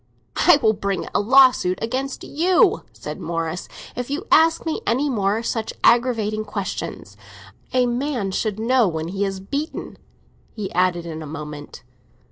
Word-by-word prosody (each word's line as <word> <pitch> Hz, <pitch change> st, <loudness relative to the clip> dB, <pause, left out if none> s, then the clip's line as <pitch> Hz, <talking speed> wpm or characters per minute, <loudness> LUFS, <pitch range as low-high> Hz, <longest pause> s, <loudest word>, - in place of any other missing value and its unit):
"I 350 Hz, -, +8 dB
will 220 Hz, -1 st, +5 dB
bring 200 Hz, -1 st, -2 dB
a -, -, +2 dB
lawsuit 250 Hz, -5 st, +5 dB
against 260 Hz, +4 st, -3 dB
you," 370 Hz, -, +3 dB
said -, -, -8 dB
Morris, 165 Hz, +1 st, -3 dB, 0.3 s
"if 245 Hz, 0 st, -4 dB
you 300 Hz, +8 st, -3 dB
ask 325 Hz, +1 st, +4 dB
me 320 Hz, -, -2 dB
any 270 Hz, +5 st, +1 dB
more 210 Hz, 0 st, 0 dB
such 225 Hz, -1 st, -2 dB
aggravating 225 Hz, -3 st, +3 dB
questions. 205 Hz, -2 st, -5 dB, 0.6 s
A 255 Hz, -1 st, +3 dB
man 245 Hz, -4 st, -1 dB
should 210 Hz, +1 st, -1 dB
know 240 Hz, 0 st, +3 dB
when 160 Hz, -1 st, -3 dB
he 200 Hz, +2 st, -1 dB
is 195 Hz, -1 st, -3 dB
beaten," 280 Hz, +11 st, -5 dB, 0.6 s
he 210 Hz, -3 st, -5 dB
added, 175 Hz, -1 st, +1 dB
in 160 Hz, -1 st, -6 dB
a 155 Hz, -, -7 dB
moment. 150 Hz, -1 st, -8 dB
220 Hz, 150 wpm, -22 LUFS, 190-260 Hz, 0.6 s, I